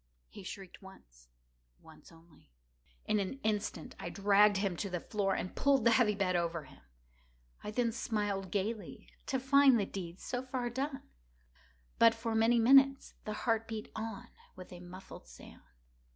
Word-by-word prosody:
He - - -11
shrieked 190 0 -9
once—once - - -19
only. 165 - -21 0.6
In 210 - +1
an 200 +8 -3
instant 210 -6 -2
I - - -5
dragged 200 +2 +4
him 195 -2 -1
to 200 - -3
the 180 -1 -3
floor, 195 +1 -1
and 185 - -4
pulled 275 -4 +2
the 235 - +6
heavy 220 -3 +3
bed 190 -2 0
over 170 -2 -1
him. 135 - -17 0.8
I - - -5
then 230 +2 0
smiled 205 -4 -2
gaily, 200 -5 -4 0.2
to 265 - 0
find 270 -1 +5
the 200 - 0
deed 180 -2 -7
so 245 - -4
far 255 -2 -3
done. 270 +2 -3 1.0
But, 230 0 +6
for 225 0 -3
many 225 +2 +3
minutes, 270 +3 +5
the 215 - -3
heart 225 -2 +1
beat 220 -2 -6
on 220 -2 -6 0.3
with 185 0 -11
a 175 - -10
muffled 180 +2 -11
sound. - - -14
210 Hz, 160 wpm, -33 LUFS, 180-230 Hz, 1.0 s, the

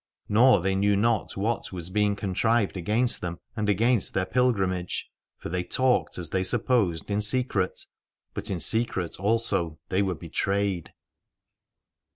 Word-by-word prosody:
Nor 115 0 +5
they 95 +2 0
knew 100 +1 +2
not 110 0 0
what 110 +4 -2
was 90 -1 -4
being 105 0 +1
contrived 100 +2 0
against 105 +7 0
them 85 -1 -5 0.2
and 105 -2 -1
against 115 +1 +2
their 95 - +1
pilgrimage. 95 -5 0 0.3
For - - -7
they 90 +1 -2
talked, 130 +7 +1
as 85 -4 -4
they 95 0 0
supposed, 105 -6 +1
in 100 +1 +1
secret: 105 -4 +2 0.5
but 105 - -4
in 95 -3 -2
secret 95 -6 0
also 100 -6 0
they 95 +2 +1
were 95 -2 -1
betrayed. 95 +2 -2
100 Hz, 145 wpm, -26 LUFS, 90-115 Hz, 0.5 s, Nor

